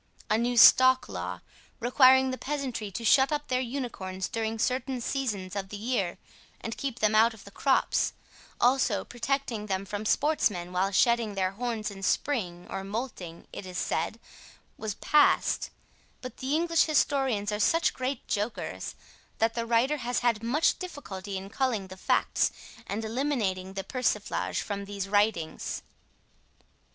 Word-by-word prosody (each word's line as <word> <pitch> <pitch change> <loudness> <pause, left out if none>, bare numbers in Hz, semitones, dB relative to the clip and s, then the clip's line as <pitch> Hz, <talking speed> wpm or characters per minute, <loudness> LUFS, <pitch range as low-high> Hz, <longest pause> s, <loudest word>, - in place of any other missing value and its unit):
A 215 - +4
new 240 +1 0
stock 255 +2 +7
law, - - -5 0.4
requiring 260 +2 +5
the 255 - -4
peasantry 260 -7 -3
to 230 +4 -6
shut 265 +5 +5
up 295 0 -2
their 255 0 +1
unicorns 230 -8 -4
during 225 -1 -2
certain 255 +2 -1
seasons 215 -8 -3
of 195 -1 -4
the 205 - -6
year 205 -5 -1 0.4
and 225 - -5
keep 270 -4 -4
them 215 -2 +2
out 225 +1 +5
of 205 - -15
the 200 - -13
crops, 270 +6 +1 0.5
also 260 +2 +2
protecting 240 -3 -2
them 190 -1 -2
from 205 +2 -4
sportsmen 205 - +1
while 185 +2 +1
shedding 230 +1 +2
their 185 -1 0
horns 220 0 -3
in 195 -1 -10
spring, 185 -5 -1
or 195 0 -5
moulting, 195 -5 -6
it - - -6
is 185 -1 -7
said, 165 +9 -1 0.6
was 215 -3 -4
passed, 300 -1 +3 0.5
but 255 - -8
the 270 +3 -1
English 335 0 +3
historians 270 -9 +1
are 210 - -2
such 330 +9 +3
great 255 0 -4
jokers 210 +2 -3 0.4
that 225 0 +2
the 230 -1 -3
writer 240 +6 +2
has 245 -2 -2
had 235 -3 +1
much 260 +8 +2
difficulty 205 - -6
in 190 +1 -7
culling 220 -4 -1
the 185 - -8
facts 190 - +1 0.4
and 220 +3 -3
eliminating 220 -7 -1
the 195 0 -4
persiflage 230 -4 -1
from 200 -1 -4
these 200 -1 -4
writings. 205 -6 0
230 Hz, 155 wpm, -28 LUFS, 200-260 Hz, 0.6 s, stock